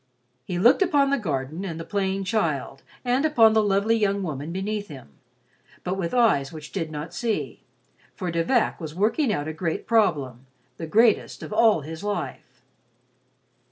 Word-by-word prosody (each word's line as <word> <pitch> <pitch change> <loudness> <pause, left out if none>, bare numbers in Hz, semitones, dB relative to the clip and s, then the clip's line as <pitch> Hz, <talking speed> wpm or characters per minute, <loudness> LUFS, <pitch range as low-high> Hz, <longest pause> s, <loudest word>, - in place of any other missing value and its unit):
He 175 - -3
looked 235 - +5
upon 285 -7 +3
the 280 - +2
garden 155 - -3
and 165 -4 -5
the - - -5
playing 195 0 -1
child, 165 - -1 0.2
and 250 +3 +2
upon 235 -8 +5
the 220 - +4
lovely 205 +2 +2
young 200 -2 0
woman 150 -2 -4
beneath 205 +3 -3
him, 135 - -11 0.7
but 180 - -2
with 175 -3 -3
eyes 215 - +3
which 155 -1 -10
did 165 -5 -3
not 155 +2 -6
see, 225 +4 -3 0.5
for 180 -3 -3
De 165 0 0
Vac 240 -1 +1
was 155 -1 -6
working 225 - +1
out 145 -6 -2
a 155 - -4
great 160 0 -3
problem, 145 - +1 0.3
the 165 - -6
greatest 220 +6 +2
of - - -7
all 220 -6 +4
his 160 +5 -8
life. 130 -10 -5
190 Hz, 170 wpm, -24 LUFS, 155-220 Hz, 0.7 s, looked